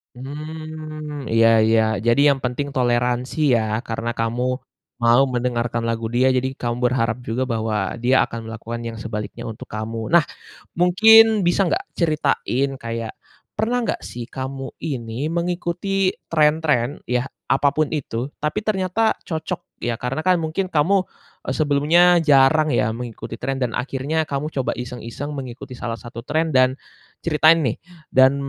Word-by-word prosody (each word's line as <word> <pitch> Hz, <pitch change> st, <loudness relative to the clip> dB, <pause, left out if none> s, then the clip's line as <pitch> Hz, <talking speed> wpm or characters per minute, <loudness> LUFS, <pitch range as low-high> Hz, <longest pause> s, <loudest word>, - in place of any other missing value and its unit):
Mmm, 155 Hz, +1 st, -7 dB
iya 115 Hz, 0 st, +4 dB, 0.2 s
iya, 110 Hz, 0 st, +4 dB, 0.3 s
jadi 120 Hz, +4 st, +4 dB
yang -, -, -8 dB
penting 125 Hz, +3 st, -2 dB
toleransi 125 Hz, +3 st, +1 dB
ya 110 Hz, -2 st, 0 dB
karena 115 Hz, +1 st, -3 dB
kamu, 115 Hz, +1 st, -2 dB, 0.6 s
mau 120 Hz, +2 st, +5 dB
mendengarkan 120 Hz, -1 st, -1 dB
lagu 115 Hz, 0 st, -2 dB
dia 130 Hz, +2 st, +4 dB
jadi 130 Hz, +1 st, +1 dB
kamu 120 Hz, -1 st, -1 dB
berharap 120 Hz, -2 st, +1 dB
juga 125 Hz, +2 st, -2 dB
bahwa 110 Hz, -4 st, -1 dB
dia 130 Hz, +2 st, +4 dB
akan 115 Hz, -, -6 dB
melakukan 115 Hz, +1 st, -6 dB
yang 115 Hz, -1 st, -7 dB
sebaliknya 110 Hz, -1 st, -5 dB
untuk 110 Hz, -1 st, -7 dB
kamu. 110 Hz, +1 st, -4 dB
Nah, 170 Hz, -3 st, +6 dB, 0.5 s
mungkin 220 Hz, +4 st, +6 dB
bisa 185 Hz, +2 st, +3 dB
nggak 375 Hz, +4 st, -1 dB
ceritain 150 Hz, -5 st, +1 dB
kayak, 115 Hz, -1 st, -4 dB, 0.5 s
pernah 240 Hz, +3 st, +1 dB
nggak -, -, -1 dB
sih 120 Hz, 0 st, -7 dB
kamu 135 Hz, 0 st, -5 dB
ini 130 Hz, -3 st, -4 dB
mengikuti 175 Hz, +3 st, -1 dB, 0.2 s
tren-tren 150 Hz, -4 st, +2 dB
ya 125 Hz, +1 st, -1 dB, 0.3 s
apa 145 Hz, -, +3 dB
pun 155 Hz, +2 st, +1 dB
itu 135 Hz, -3 st, -3 dB
tapi 150 Hz, +7 st, -2 dB
ternyata 210 Hz, +1 st, +1 dB
cocok 160 Hz, -2 st, -5 dB
ya 120 Hz, -1 st, -2 dB
karena 135 Hz, +6 st, -3 dB
kan 185 Hz, -2 st, +3 dB
mungkin 170 Hz, +4 st, -2 dB
kamu, 160 Hz, +6 st, +3 dB, 0.5 s
eee, -, -, -2 dB
sebelumnya 155 Hz, +4 st, +4 dB
jarang 150 Hz, +2 st, +5 dB
ya 110 Hz, -, +2 dB
mengikuti 120 Hz, -2 st, -7 dB
tren 135 Hz, +3 st, -3 dB
dan 125 Hz, -3 st, -1 dB
akhirnya 140 Hz, +5 st, -1 dB
kamu 145 Hz, 0 st, -3 dB
coba 135 Hz, -2 st, -1 dB
iseng-iseng 125 Hz, +4 st, -6 dB
mengikuti 130 Hz, -1 st, -7 dB
salah 115 Hz, -1 st, -4 dB
satu 115 Hz, +1 st, -9 dB
trend 160 Hz, +4 st, -1 dB
dan, 130 Hz, +1 st, +4 dB, 0.4 s
ceritain 160 Hz, 0 st, +4 dB
nih 120 Hz, -6 st, -1 dB, 0.3 s
dan 130 Hz, +1 st, +5 dB
135 Hz, 145 wpm, -21 LUFS, 120-155 Hz, 0.6 s, Nah